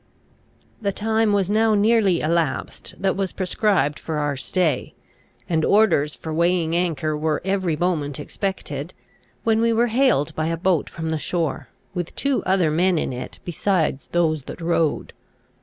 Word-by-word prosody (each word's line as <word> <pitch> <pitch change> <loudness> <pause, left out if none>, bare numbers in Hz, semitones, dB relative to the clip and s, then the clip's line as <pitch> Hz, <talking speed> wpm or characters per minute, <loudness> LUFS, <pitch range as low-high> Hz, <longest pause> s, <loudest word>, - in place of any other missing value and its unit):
The 200 -2 0
time 220 +1 +1
was 200 -3 +2
now 215 +1 +3
nearly 205 -4 +3
elapsed 160 -3 -1
that 190 0 +1
was 195 -1 -1
prescribed 185 -5 +1
for 160 -2 -4
our 145 -1 0
stay, 155 +1 -1 0.5
and 160 -2 +1
orders 165 -9 +3
for 160 - -6
weighing 170 0 +1
anchor 160 -3 0
were 155 0 0
every 190 -4 0
moment 150 -5 -1
expected, 160 -2 -4 0.5
when 225 0 +2
we 230 0 +3
were 235 +1 +2
hailed 230 - +2
by 155 0 -1
a 165 0 -1
boat 175 -2 +1
from 160 -1 -4
the 160 - -1
shore, 165 0 -2 0.3
with 175 -2 -4
two 275 -1 0
other 185 -5 +2
men 175 +3 +2
in 135 - -1
it 125 - -7
besides 175 -4 0
those 155 -5 0
that - - -8
rowed. 165 -2 0
175 Hz, 155 wpm, -22 LUFS, 155-200 Hz, 0.5 s, now